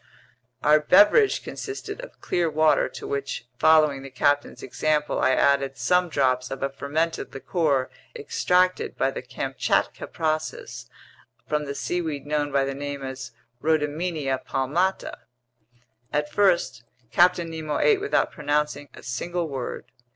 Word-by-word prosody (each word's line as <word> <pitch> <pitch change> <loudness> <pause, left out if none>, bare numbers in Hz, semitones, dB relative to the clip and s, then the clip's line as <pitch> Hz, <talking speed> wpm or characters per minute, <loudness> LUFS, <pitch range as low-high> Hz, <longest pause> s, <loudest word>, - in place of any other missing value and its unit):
Our 150 +1 +6
beverage 205 - +5
consisted 410 +4 -6
of - - -12
clear 175 -2 0
water 155 0 +3
to - - -9
which, 140 -3 -4
following 155 -3 +4
the 135 - -9
captain's 145 +3 0
example, 150 +3 0
I - - +3
added 135 0 +2
some 180 -1 +2
drops 130 -4 +1
of 135 0 -5
a 135 - -1
fermented 155 +4 -2
liquor 135 0 0 0.3
extracted 185 - +1
by 135 - +1
the - - -5
Kamchatka 130 +1 -1
process 155 -6 -3 0.6
from 150 -1 -1
the 140 0 -5
seaweed 155 -4 -3
known 145 0 -1
by 135 0 +2
name 140 0 -5
as 130 -1 -6 0.3
Rhodymenia 155 -2 -1
palmata. 165 +9 -1 0.9
At 150 0 -1
first 170 - +2 0.3
Captain 175 +2 +3
Nemo 155 -2 -3
ate 425 -3 +3
without 420 - +1
pronouncing 150 -1 -1
a - - -13
single 170 +8 -3
word. 135 -4 -6
150 Hz, 130 wpm, -25 LUFS, 135-170 Hz, 0.9 s, Our